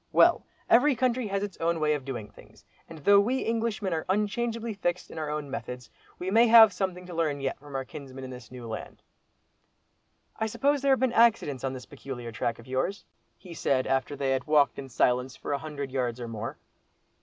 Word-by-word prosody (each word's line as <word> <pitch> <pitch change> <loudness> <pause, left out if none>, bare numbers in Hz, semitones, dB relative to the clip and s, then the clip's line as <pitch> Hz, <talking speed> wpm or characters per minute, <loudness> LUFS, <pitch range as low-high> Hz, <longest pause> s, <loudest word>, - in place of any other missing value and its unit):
Well! - - +5 0.2
every 265 +4 +5
country 250 -1 0
has 200 0 -1
its 205 -3 -5
own 165 0 0
way 150 -1 +2
of 145 -3 -4
doing 120 -6 -6
things; - - -18 0.2
and 165 - -9
though 200 +7 +5
we 250 +6 +1
Englishmen 225 -4 -1
are 160 - -3
unchangeably 225 +3 -1
fixed 180 -3 -2
in 160 - -6
our 155 -1 -3
own 150 -2 -4
methods, 125 -2 -6 0.3
we 185 +2 -3
may 230 +3 +6
have 225 -2 +9
something 185 -2 -3
to 180 - -9
learn 155 -4 0
yet 135 -1 -3
from 145 0 -11
our 135 0 -2
kinsmen 135 +1 -9
in 130 - -7
this 125 -4 -10
new 125 -2 -9
land." 110 - -7 1.3
"I 220 - 0
suppose 280 +5 +1
there 275 -1 +4
have 265 - +1
been 260 -2 +1
accidents 225 - +3
on 135 -1 -1
this 125 -2 -8
peculiar 130 -4 -7
track 115 +1 -2
of 115 - -14
yours?" 130 +10 -2 0.3
he 180 -2 -11
said, 135 -5 +1
after 135 +2 0
they 135 -1 -1
had 130 +1 -1
walked 150 -2 +3
in 135 -1 -7
silence 125 +1 +1
for - - -4
a 140 - -1
hundred 145 -3 -6
yards 125 -2 -1
or 120 - -5
more. 115 0 -5
150 Hz, 215 wpm, -28 LUFS, 130-205 Hz, 1.3 s, have